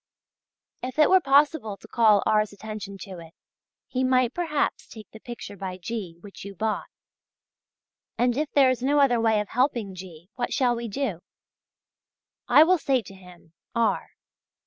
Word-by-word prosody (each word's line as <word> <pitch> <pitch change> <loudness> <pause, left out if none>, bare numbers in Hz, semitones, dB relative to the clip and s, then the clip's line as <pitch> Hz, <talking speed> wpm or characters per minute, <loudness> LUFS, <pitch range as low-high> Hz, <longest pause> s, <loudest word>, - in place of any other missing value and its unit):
If 255 +2 -6
it 305 +2 +5
were 375 0 +6
possible 275 -7 +2
to 220 - -16
call 215 -3 +4
R.'s 215 -1 +2
attention 205 -1 -8
to 185 -3 -8
it, 165 0 -14 0.5
he 260 0 -2
might 255 -1 +2
perhaps 320 -5 -1
take 215 -3 -12
the 220 - -12
picture 240 -3 -9
by 185 -1 -6
G. 185 -3 -6
which 200 0 -11
you 200 0 -9
bought; 215 +3 -2 1.3
and 245 0 +2
if 300 +2 -1
there 270 -2 +5
is 255 - -3
no 285 +3 +2
other 245 -4 +3
way 220 -2 +3
of 210 - -8
helping 240 -6 0
G. 180 0 -12
what 245 - -3
shall 245 -2 +2
we 235 0 -5
do? 215 -6 -3 1.3
I 275 +5 +7
will 360 +2 +3
say 265 -5 +1
to 195 - -12
him 180 -3 -17 0.2
(R.) 230 -1 0
230 Hz, 170 wpm, -25 LUFS, 200-260 Hz, 1.3 s, I